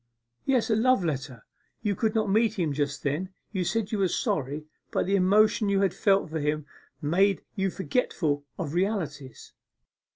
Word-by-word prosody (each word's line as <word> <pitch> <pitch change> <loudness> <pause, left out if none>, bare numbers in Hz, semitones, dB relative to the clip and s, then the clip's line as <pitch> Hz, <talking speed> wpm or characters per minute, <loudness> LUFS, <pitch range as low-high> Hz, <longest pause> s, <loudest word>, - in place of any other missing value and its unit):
'Yes, 255 -4 +2
a - - +4
love 240 -3 +3
letter 135 -6 -4 0.4
you 205 -2 +1
could 220 +2 0
not 215 -1 +2
meet 220 +2 +2
him 165 -6 0
just 140 0 -2
then, 150 +6 -1 0.2
you 190 -4 -1
said 215 +2 -1
you 215 - -1
were 195 - +3
sorry, 150 -2 -1 0.2
but - - 0
the 195 +2 +2
emotion 205 +2 +4
you 200 0 +2
had 195 -3 +2
felt 195 -6 +2
with 160 -1 -2
him 150 0 -1 0.4
made 190 +6 +2
you 195 0 +1
forgetful 175 - -1
of 160 -5 -4
realities. 165 - -3
190 Hz, 170 wpm, -27 LUFS, 150-210 Hz, 0.4 s, a